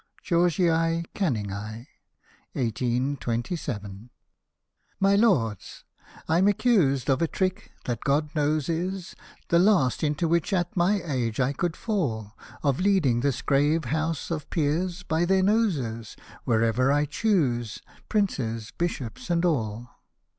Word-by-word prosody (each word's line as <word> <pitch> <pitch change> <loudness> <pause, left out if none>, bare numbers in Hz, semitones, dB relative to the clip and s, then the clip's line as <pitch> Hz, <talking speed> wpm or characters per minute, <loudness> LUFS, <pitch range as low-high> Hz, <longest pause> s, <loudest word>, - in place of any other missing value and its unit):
Georgii 175 0 +2 0.5
Canningii. 110 - -3 0.7
1827. 120 - -2 0.9
My 195 +1 +4
Lords, 135 - +1 0.4
I'm 175 +5 +3
accused 185 - +2
of 135 +1 +2
a 165 - +2
trick 185 +2 -2
that, 120 -2 -3
God 145 +2 +1
knows, 150 -2 0
is 180 +2 -3 0.4
The 170 - +4
last 180 - +3
into 150 +2 0
which, 170 +4 +1
at 175 -2 0
my 190 +3 +2
age, 125 -7 -2
I 130 +2 +2
could 175 +3 -2
fall 115 - -2
— - - -19
Of 140 -3 +1
leading 180 -11 +3
this 135 0 -1
grave 145 +3 +2
House 160 +5 -2
of 155 -3 -4
Peers, 170 +3 -1
by 160 +2 0
their 190 +2 +3
noses, 150 - 0 0.3
Wherever 115 +3 +2
I 145 +1 +2
choose, 140 - 0 0.3
princes, 115 - -1
bishops, 170 -6 -4
and 170 0 +2
all. 120 -7 -1
150 Hz, 125 wpm, -26 LUFS, 120-175 Hz, 0.9 s, My